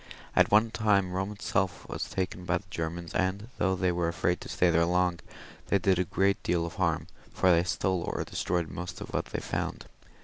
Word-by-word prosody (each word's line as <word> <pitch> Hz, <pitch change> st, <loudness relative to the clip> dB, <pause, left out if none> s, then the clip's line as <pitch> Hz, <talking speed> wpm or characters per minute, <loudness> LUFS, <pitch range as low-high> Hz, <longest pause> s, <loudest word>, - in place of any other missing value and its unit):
At -, -, +5 dB
one 110 Hz, +2 st, +5 dB
time 100 Hz, -5 st, +2 dB
Eome 95 Hz, +2 st, -2 dB
itself 95 Hz, -2 st, -1 dB
was -, -, -4 dB
taken 90 Hz, -1 st, -3 dB
by 90 Hz, -1 st, +1 dB
the 95 Hz, -, -10 dB
Germans, 85 Hz, 0 st, -4 dB
and 95 Hz, +4 st, -1 dB
though 95 Hz, +1 st, +2 dB
they 90 Hz, 0 st, +1 dB
were 85 Hz, -1 st, 0 dB
afraid 85 Hz, +1 st, 0 dB
to -, -, -8 dB
stay 90 Hz, -1 st, +3 dB
there 85 Hz, 0 st, +4 dB
long, 90 Hz, 0 st, +2 dB, 0.5 s
they 100 Hz, -, +3 dB
did 95 Hz, -1 st, +2 dB
a 90 Hz, -, +2 dB
great 100 Hz, +3 st, +1 dB
deal 85 Hz, -1 st, +1 dB
of 85 Hz, -, -6 dB
harm, 85 Hz, -4 st, +1 dB, 0.3 s
for 95 Hz, -, +3 dB
they 85 Hz, 0 st, +5 dB
stole 95 Hz, 0 st, 0 dB
or -, -, -2 dB
destroyed 85 Hz, -2 st, -1 dB
most 90 Hz, 0 st, -6 dB
of -, -, -7 dB
what -, -, 0 dB
they -, -, -4 dB
found. -, -, -3 dB
90 Hz, 210 wpm, -29 LUFS, 85-95 Hz, 0.5 s, At